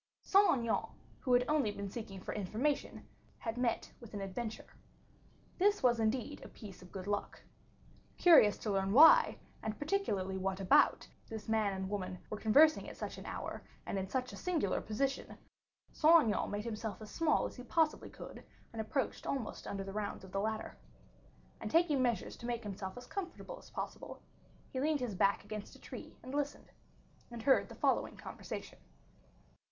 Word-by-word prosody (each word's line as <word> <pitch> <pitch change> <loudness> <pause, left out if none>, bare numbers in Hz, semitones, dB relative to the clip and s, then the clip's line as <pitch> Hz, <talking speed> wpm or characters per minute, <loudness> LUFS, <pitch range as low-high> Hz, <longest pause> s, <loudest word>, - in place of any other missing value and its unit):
Saint 400 +1 +6
Aignan, 235 -4 +1 0.3
who 255 - -2
had 245 0 +5
only 300 -7 +2
been 200 -1 -4
seeking 210 -4 -6
for - - -5
information, 220 +9 -2 0.3
had 225 -1 -4
met 245 -2 -1
with 230 -3 -11
an 200 - -3
adventure. 215 +4 -4 0.9
This 410 -1 +3
was 240 -2 +4
indeed 245 +6 -1
a - - -8
piece 200 -6 -11
of 180 - -14
good 185 -2 -6
luck. 205 0 -3 0.7
Curious 295 - +7
to 215 - -3
learn 195 0 +1
why, 310 +6 +8 0.2
and 215 -1 -3
particularly 210 - -1
what 190 0 -1
about, 190 -1 +4 0.2
this 220 -1 -6
man 220 -2 +2
and 190 0 -3
woman 185 -2 -3
were 210 - -3
conversing 295 +9 +5
at - - -11
such - - -5
an - - -9
hour, - - -5 0.2
and 195 - -2
in 190 0 -4
such 255 -1 -2
a - - -7
singular 330 - 0
position, 265 +6 -2 0.5
Saint 325 0 +6
Aignan 215 -4 0
made 205 +1 -3
himself 220 -2 -4
as 215 -1 -10
small 325 -2 +2
as - - -6
he - - -7
possibly 315 +4 +1
could, - - -10 0.3
and 225 - -2
approached 260 +5 -2
almost 265 -6 -3
under 195 -1 -3
the 195 0 -7
rounds 205 -2 -3
of 190 - -11
the 195 - -1
ladder. 220 +1 -3 0.8
And - - -4
taking 320 -5 +3
measures 235 -6 0
to 235 - -7
make 240 -1 -2
himself 195 0 -5
as 245 - -8
comfortable 395 +6 -6
as - - -16
possible, - - -6 0.5
he 260 - -1
leaned 300 +1 +2
his 245 -4 -2
back 195 +2 +2
against 210 0 -7
a - - -15
tree - - -9
and 255 - -8
listened, 285 0 -3 0.6
and 235 -2 -7
heard 265 +2 +4
the - - -9
following - - +1
conversation. - - -7
225 Hz, 180 wpm, -34 LUFS, 200-275 Hz, 0.9 s, why